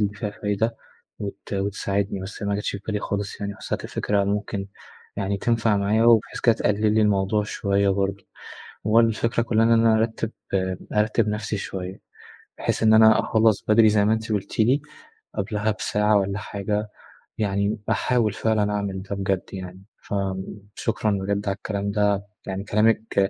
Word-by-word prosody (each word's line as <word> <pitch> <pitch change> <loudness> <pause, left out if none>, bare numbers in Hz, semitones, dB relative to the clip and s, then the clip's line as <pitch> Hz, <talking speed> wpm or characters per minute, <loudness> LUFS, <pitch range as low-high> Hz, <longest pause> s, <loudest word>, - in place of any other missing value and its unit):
اللي 105 -1 0
فيها 105 0 -4
فايدة 105 +3 -1 0.4
وت 100 0 -7
وتساعدني، 100 0 -1
بس 95 +2 -8
ما 100 0 0
جاتش 105 - -2
في 100 - -5
بالي 105 -2 -1
خالص 100 0 -4
يعني 100 0 -4
حسيت - - -4
الفكرة 100 -1 0
ممكن 100 0 -2 0.5
يعني 100 0 -1
تنفع 115 0 +1
معايا 105 +3 +2
وبحيث 115 -2 +4
كده 115 - +5
تقلل 105 +1 +1
لي 110 - +4
الموضوع 105 0 +2
شوية 100 -1 0
برضه. 100 0 -1 0.6
وبرضه 115 +2 +5
الفكرة 115 +1 0
كلّها 115 -1 +2
إن 115 - +3
أنا 115 -1 +5
أرتِب 110 0 -1 0.6
أرتِب 105 +1 +2
نفسي 105 0 -2
شوية. 95 -1 -6 0.6
بحيث - - -1
إن 110 0 +6
أنا 110 0 +7
أخلّص 110 -2 +2
بدري 110 0 +6
زي 105 -1 +3
ما 110 - +4
أنت 110 0 -3
قُلتِ 105 +1 -3
لي 130 +6 +4 0.5
قبلها 105 0 -1
بساعة 105 0 +1
والّا 100 +1 -2
حاجة، 105 +1 -3 0.5
يعني 100 0 0
أحاول 115 -5 +1
فعلًا 110 -2 +1
أعمل 100 -2 -2
ده 100 +1 -5
بجد 95 -1 -1
يعني. 95 0 -8 0.2
فشكرًا 100 +3 -3
بجد 100 +1 -1
على 95 - 0
الكلام 100 -1 -3
ده، 100 -1 +1 0.2
يعني 95 0 -3
كلامِك 105 -1 +2
105 Hz, 160 wpm, -24 LUFS, 100-110 Hz, 0.6 s, أنا